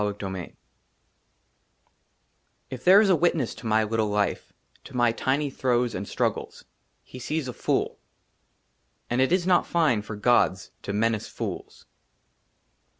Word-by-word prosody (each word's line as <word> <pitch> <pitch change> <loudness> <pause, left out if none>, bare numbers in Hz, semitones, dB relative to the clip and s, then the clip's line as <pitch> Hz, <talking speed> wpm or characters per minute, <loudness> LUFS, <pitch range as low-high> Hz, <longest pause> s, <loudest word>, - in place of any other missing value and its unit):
n 105 - +1
i 105 - -2
XIII 95 -3 -6 2.2
IF 125 -2 -7
THERE 190 +3 +7
IS 210 - +2
A - - +5
WITNESS 160 -6 +1
TO 115 - -8
MY 110 0 +3
LITTLE 110 0 0
LIFE, 105 0 -1 0.3
TO 135 - -9
MY 120 -1 +4
TINY 135 +5 -1
THROES 125 -2 0
AND 100 +1 -5
STRUGGLES, - - -3 0.4
HE 130 - -11
SEES 150 +3 -3
A 125 - -5
FOOL; - - -1 1.1
AND 120 +2 +2
IT 130 - +2
IS 180 -1 +2
NOT 180 -1 +3
FINE 155 -11 +2
FOR 105 +1 -7
GODS 105 -4 +2
TO - - -5
MENACE 110 +1 0
FOOLS. - - -7
120 Hz, 150 wpm, -25 LUFS, 105-145 Hz, 2.2 s, THERE